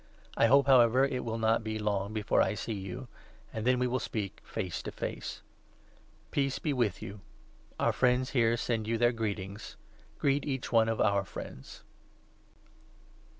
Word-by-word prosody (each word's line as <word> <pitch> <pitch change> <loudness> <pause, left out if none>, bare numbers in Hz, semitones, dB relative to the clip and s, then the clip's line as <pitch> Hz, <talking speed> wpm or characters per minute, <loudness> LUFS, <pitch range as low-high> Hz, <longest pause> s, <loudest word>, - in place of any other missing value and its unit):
I 115 - +4
hope, 140 +2 +6
however, 130 -1 +6
it 130 -2 -2
will 115 -1 -3
not 110 0 +3
14 - - -12
be 110 0 -3
long 100 -1 -1
before 110 -2 +1
I 105 - +1
see 115 - -4
you, 105 +6 -6 0.5
and 110 +2 -3
then 130 0 +4
we 125 - +1
will 125 +1 0
speak 105 -3 -4
face 95 -6 -4
to - - -6
face. - - -5 0.9
Peace 135 -1 0
be 150 - -1
with 120 -8 0
you. 100 +1 -8 0.6
Our - - +2
friends 125 0 +2
here 115 -2 +3
send 115 -2 -1
you 115 0 +1
their 120 +1 +4
greetings. 105 -3 -4 0.4
Greet 140 0 +1
each 135 -3 -3
one 115 -1 +4
of 115 - -1
our 100 -2 +3
friends. 70 -7 -9
115 Hz, 170 wpm, -30 LUFS, 105-125 Hz, 0.9 s, hope